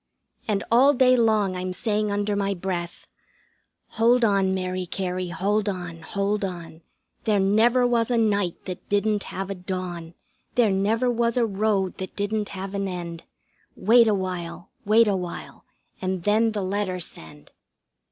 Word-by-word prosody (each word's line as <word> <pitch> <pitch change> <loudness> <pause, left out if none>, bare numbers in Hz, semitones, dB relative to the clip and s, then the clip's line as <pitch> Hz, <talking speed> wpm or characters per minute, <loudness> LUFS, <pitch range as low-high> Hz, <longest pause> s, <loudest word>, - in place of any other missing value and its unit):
And 200 -2 0
all 270 +5 +6
day 255 0 +5
long 215 -5 +2
I'm 185 0 -3
saying 210 +1 -1
under 205 0 0
my 200 -1 0
breath: 175 -1 -4 0.8
"Hold 235 +1 +3
on, 195 -3 +2
Mary 185 -1 -2
Cary, 185 0 -3
hold 200 +5 0
on, 175 -3 -6
hold 200 +4 -1
on. 170 -3 -6 0.4
There 210 -3 +3
never 225 +6 +3
was 235 -1 +1
a 240 - +2
night 205 -5 0
that 185 -2 -7
didn't 205 0 +1
have 195 +1 -5
a - - 0
dawn. 180 -3 -6 0.4
There 230 -4 +4
never 220 +6 +1
was 235 0 0
a 240 - +3
road 200 -2 0
that 190 - -6
didn't 210 0 -2
have 195 0 -6
an 200 0 -1
end. 170 -2 -6 0.5
Wait 230 +3 +5
awhile, 185 -4 -3
wait 220 +2 +5
awhile, 185 -4 -4 0.4
and 185 -2 -2
then 220 +3 +2
the 205 -2 -2
letter 190 -1 -2
send." 80 - -8
200 Hz, 150 wpm, -24 LUFS, 185-220 Hz, 0.8 s, all